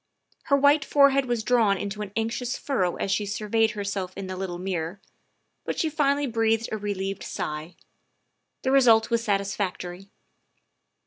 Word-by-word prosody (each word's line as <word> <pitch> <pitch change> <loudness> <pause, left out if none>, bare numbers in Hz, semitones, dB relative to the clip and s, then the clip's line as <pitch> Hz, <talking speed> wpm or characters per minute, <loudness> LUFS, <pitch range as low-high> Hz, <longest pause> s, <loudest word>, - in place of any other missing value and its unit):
Her 280 -3 +3
white 285 +1 +4
forehead 275 -1 +4
was 240 -2 -1
drawn 220 -4 +3
into 205 +2 -4
an 205 -2 -5
anxious 230 +3 -2
furrow 185 -11 -1
as 195 - -2
she 210 - +1
sur 210 +1 -4
veyed 225 +1 +2
herself 200 -3 -4
in 195 - -4
the 185 0 -5
little 185 -2 -4
mirror, 180 0 -3 0.6
but - - -4
she 320 - 0
finally 290 -1 +1
breathed 225 -2 +1
a 220 - -1
relieved 195 -1 -3
sigh. 155 +3 -5 0.9
The 260 - +1
result 235 -5 +5
was 230 0 +1
satisfactory. 195 -2 -2
210 Hz, 155 wpm, -26 LUFS, 195-245 Hz, 0.9 s, result